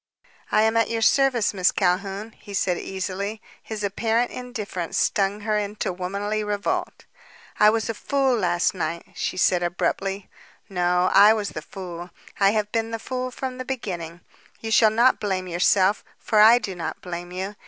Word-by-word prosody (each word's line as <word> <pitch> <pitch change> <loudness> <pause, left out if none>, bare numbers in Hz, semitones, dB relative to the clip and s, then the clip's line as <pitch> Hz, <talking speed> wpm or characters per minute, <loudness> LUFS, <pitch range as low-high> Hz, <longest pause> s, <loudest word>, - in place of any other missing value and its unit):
"I 215 - +4
am 220 +1 +2
at 230 - +2
your 230 -1 -1
service, 265 -4 +3
Miss 185 -2 +3
Calhoun," 195 +3 -1
he 205 -2 -10
said 180 -2 0
easily. 195 +3 -4 0.2
His 215 -2 -6
apparent 225 +4 0
indifference 215 -9 -5
stung 200 +1 +1
her 215 0 0
into 205 -2 -3
womanly 200 +4 -3
revolt. 205 -1 -3 0.5
"I 210 - +7
was 220 0 0
a 225 - -2
fool 270 +2 +1
last 175 -5 +1
night," 170 -2 -4
she - - -3
said 180 0 +3
abruptly. 190 +2 -2 0.4
"No; 180 -2 +1
I 205 +2 +8
was 210 -2 -2
the 155 - -6
fool. 175 0 -8 0.3
I 195 -1 +5
have 210 0 -1
been 225 0 -1
the 225 - -3
fool 255 +2 -4
from 255 0 -6
the - - -3
beginning. 180 -10 -5 0.4
You 225 - -5
shall 220 0 +6
not 235 +4 +3
blame 190 -3 -2
yourself, 185 +3 +2
for 215 - +1
I 220 +3 +8
do 210 -5 -4
not 165 -3 -5
blame 175 0 -6
you. 190 +3 -5
205 Hz, 175 wpm, -24 LUFS, 185-225 Hz, 0.5 s, I